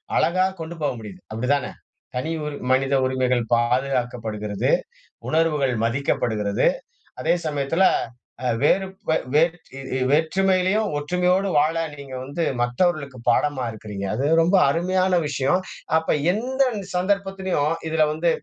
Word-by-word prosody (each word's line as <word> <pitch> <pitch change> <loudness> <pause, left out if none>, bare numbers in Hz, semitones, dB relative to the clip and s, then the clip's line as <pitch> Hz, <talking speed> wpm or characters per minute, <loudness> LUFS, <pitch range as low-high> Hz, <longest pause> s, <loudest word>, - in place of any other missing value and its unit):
அழகா 185 +3 +3
கொண்டு 165 +1 -6
போக 145 - +1
முடியுது. 100 -4 -10
அப்படி 115 +3 -3
தான? 140 - -2 0.5
தனி 130 +6 -2 0.4
மனித 135 +1 +2
உரிமைகள் 130 -1 +1
பாதுகாக்கப்படுகிறது. 120 -4 0 0.6
உணர்வுகள் 155 -4 +2
மதிக்கப்படுகிறது. 115 -4 0 0.6
அதே - - +2
சமயத்துல 150 +5 +1 0.6
அ - - +2
வேறு 190 +5 +3 0.5
வேட் 165 +2 +3 0.5
வேற்றுமையிலயும் 190 +6 +2
ஒற்றுமையோடு 180 +5 +1
வாழ 150 +2 +3 0.2
நீங்க 140 -2 -10
வந்து 145 +6 -3 0.2
மற்றவர்களுக்கு 140 +2 0
பாடமா 130 +2 +1
இருக்கிறீங்க. 105 -2 -6
அது 130 +5 -1 0.2
ரொம்ப 175 +4 +3
அருமையான 185 +4 +1
விஷயம். 145 +7 +1 0.4
அப்ப 160 - -2 0.3
எந்த 255 +6 -2
இந்த 200 -2 -5
சந்தர்ப்பத்திலும், 190 -4 0 0.2
இதுல 160 0 +3
வந்து 170 +2 +1
150 Hz, 115 wpm, -23 LUFS, 125-180 Hz, 0.6 s, அழகா